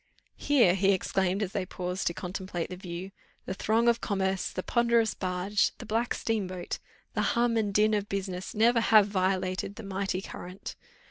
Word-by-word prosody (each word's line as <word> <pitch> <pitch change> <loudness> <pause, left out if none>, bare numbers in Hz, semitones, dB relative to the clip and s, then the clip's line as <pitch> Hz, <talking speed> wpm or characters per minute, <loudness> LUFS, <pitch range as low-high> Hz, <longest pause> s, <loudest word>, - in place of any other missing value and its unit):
"Here," 245 -11 +4
he 195 +1 +3
exclaimed, 190 +1 0
as 190 - -3
they 195 - -1
paused 180 0 -3
to 170 - +1
contemplate 180 -2 -4
the - - -4
view, 180 +1 -7 0.3
"the - - -3
throng 225 +4 +1
of 235 0 +3
commerce, 190 -2 0
the 185 - -5
ponderous 235 -2 +2
barge, 185 +2 0
the - - -9
black 230 +3 0
steam 220 -4 -1
boat, 180 -1 -5 0.3
the - - 0 0.2
hum 235 -1 +3
and 215 -3 +1
din 215 +2 +3
of 205 -1 -1
business, 190 -1 -4
never 230 +2 +4
have 215 -2 +6
violated 190 0 -1
the - - -8
mighty 195 -1 -2
current. 180 0 -8
195 Hz, 180 wpm, -29 LUFS, 185-215 Hz, 0.3 s, have